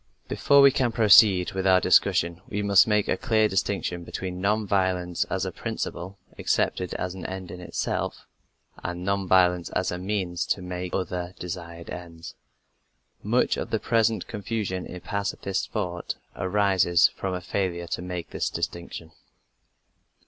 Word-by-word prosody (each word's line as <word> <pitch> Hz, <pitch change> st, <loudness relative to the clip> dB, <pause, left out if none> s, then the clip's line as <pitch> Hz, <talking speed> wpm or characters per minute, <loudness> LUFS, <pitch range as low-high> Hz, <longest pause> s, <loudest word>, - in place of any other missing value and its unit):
Before 140 Hz, 0 st, +4 dB
we 140 Hz, -, +8 dB
can 130 Hz, -3 st, +1 dB
proceed 105 Hz, -5 st, +6 dB
with 95 Hz, 0 st, -1 dB
our 95 Hz, -1 st, +6 dB
discussion, 85 Hz, -1 st, +3 dB
we 105 Hz, 0 st, -2 dB
must 100 Hz, 0 st, +5 dB
make 105 Hz, -1 st, +2 dB
a -, -, +2 dB
clear 110 Hz, -4 st, +2 dB
distinction 95 Hz, -3 st, -1 dB
between 90 Hz, +1 st, -5 dB
non 105 Hz, +2 st, +1 dB
violence 95 Hz, -3 st, 0 dB
as -, -, -2 dB
a -, -, -3 dB
principle, 95 Hz, +3 st, -5 dB, 0.2 s
accepted 90 Hz, -1 st, 0 dB
as 90 Hz, -1 st, -3 dB
an 95 Hz, -2 st, -8 dB
end 95 Hz, -2 st, -6 dB
in 90 Hz, -, -8 dB
itself, 90 Hz, -, -3 dB, 0.6 s
and 90 Hz, 0 st, -4 dB
non 100 Hz, -1 st, 0 dB
violence 90 Hz, -1 st, +3 dB
as 95 Hz, -, -1 dB
a 90 Hz, -, -4 dB
means 95 Hz, -3 st, -2 dB
to -, -, +2 dB
some 90 Hz, -1 st, -4 dB
other 90 Hz, -1 st, -4 dB
desired 85 Hz, -2 st, -7 dB
end. 85 Hz, -2 st, -8 dB, 0.9 s
Much -, -, +1 dB
of -, -, -4 dB
the -, -, 0 dB
present 115 Hz, -3 st, +1 dB
confusion 105 Hz, -3 st, -4 dB
in 90 Hz, -, -8 dB
pacifist 100 Hz, +1 st, -3 dB
thought 90 Hz, -5 st, -3 dB, 0.2 s
arises 95 Hz, -2 st, +3 dB
from 95 Hz, -1 st, -4 dB
a -, -, -3 dB
failure 90 Hz, -2 st, -2 dB
to 85 Hz, -, -4 dB
make 90 Hz, -1 st, -6 dB
this -, -, -1 dB
distinction. 85 Hz, -1 st, -5 dB
95 Hz, 155 wpm, -26 LUFS, 90-100 Hz, 0.9 s, we